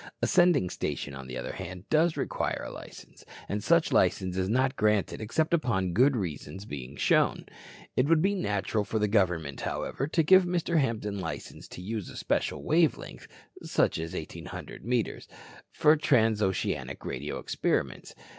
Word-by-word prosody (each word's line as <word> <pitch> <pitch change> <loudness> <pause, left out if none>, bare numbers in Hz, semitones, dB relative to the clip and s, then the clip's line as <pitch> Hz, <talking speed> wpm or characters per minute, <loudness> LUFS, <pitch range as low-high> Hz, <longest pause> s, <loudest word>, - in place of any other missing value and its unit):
A - - +1
sending 175 - +4
station, 70 - -3
on 65 -1 -8
the 65 0 -6
other 60 - -4
hand, 90 +3 -8
does 160 +1 +3
require - - -2
a - - -6
license, - - -12 0.2
and 105 +1 -3
such 170 0 +3
license 95 0 +2
is 95 0 -1
not 130 +3 +2
granted 105 0 +1
except 155 +10 0
upon 95 - +1
good 130 +8 +4
reasons 95 0 -5
being 70 -5 -7
shown. - - +2 0.5
It 130 - +2
would 165 0 +4
be 195 +5 +2
natural 105 - -1
for 110 - -2
the 105 -1 +2
government, 90 -9 0
however, 135 - -3
to 165 +2 +2
give 190 +4 +7
Mr. 175 -2 0
Hampton 110 -6 -1
license 80 -6 -6
to 90 - -9
use 105 0 -4
a - - -10
special - - -1
wave 160 -1 +3
length - - -10 0.3
such - - +1
as 80 0 -5
1,800 80 +2 -7
metres 120 0 -1 0.4
for 155 +1 +5
transoceanic 110 -9 +1
radio - - -4
experiments. - - -2
105 Hz, 165 wpm, -28 LUFS, 90-155 Hz, 0.5 s, give